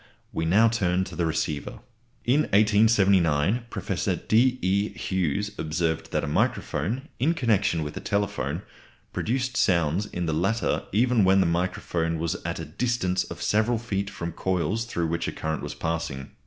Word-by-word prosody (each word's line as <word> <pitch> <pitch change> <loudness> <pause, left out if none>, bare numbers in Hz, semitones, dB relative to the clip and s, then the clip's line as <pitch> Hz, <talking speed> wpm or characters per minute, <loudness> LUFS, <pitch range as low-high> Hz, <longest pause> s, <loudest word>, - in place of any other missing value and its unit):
We 80 - -1
now 105 +8 +5
turn 95 -5 +1
to 90 -2 -8
the 85 0 0
receiver. 75 -2 -2 0.5
In 130 +5 +3 0.2
1879 100 -3 +4
Professor - - -2
D. 125 +3 +2
E. 100 +1 +1
Hughes 95 +2 -1
observed 80 0 -1
that - - 0
a - - -2
microphone, 110 - -1
in 155 +7 +2
connection 105 - +1
with 75 - -6
a - - -4
telephone, 100 -1 -2 0.5
produced 130 +2 -1
sounds 85 +2 +2
in 90 0 -3
the 80 - -1
latter 95 +9 0
even 115 +1 +3
when 95 +1 +5
the 95 - +4
microphone 85 -1 -1
was 80 0 -1
at - - -3
a 80 - -5
distance 95 +1 -1
of 85 - -7
several 110 +3 +2
feet 100 -4 -3
from 85 -3 -5
coils 95 +6 -1
through 85 -7 -2
which 85 +1 -1
a - - -1
current 80 0 -3
was - - -5
passing. 80 -5 -3
95 Hz, 165 wpm, -26 LUFS, 80-110 Hz, 0.5 s, now